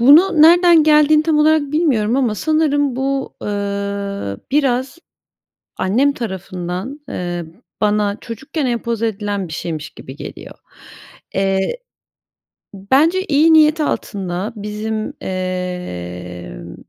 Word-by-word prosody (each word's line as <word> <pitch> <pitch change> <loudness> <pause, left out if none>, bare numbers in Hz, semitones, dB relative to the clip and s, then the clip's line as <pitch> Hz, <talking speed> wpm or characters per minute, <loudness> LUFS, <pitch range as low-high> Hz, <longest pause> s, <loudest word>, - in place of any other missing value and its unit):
Bunu 305 +6 +6
nereden 345 0 +7
geldiğini 305 0 +5
tam 310 -1 +1
olarak 300 -1 +3
bilmiyorum 260 -8 +2
ama 245 -6 +1
sanırım 290 -1 +1
bu, 270 0 -2
ııı, 200 - -3
biraz 265 +1 0 0.8
annem 250 +10 +2
tarafından, 190 - -5
eee, 175 -1 -4 0.4
bana 210 -1 +1
çocukken 270 +5 -4
empoze 235 -1 -1
edilen 205 -3 -3
bir - - -9
şeymiş 155 -1 -5
gibi 130 +2 -11
geliyor. - - -9 0.8
Eee, 195 - 0 1.2
bence 330 +8 +4
iyi 320 0 +4
niyet 310 0 +5
altında 195 -5 -3
bizim, 210 +1 -4 0.2
emm, 90 - -5
225 Hz, 105 wpm, -18 LUFS, 190-300 Hz, 1.2 s, nereden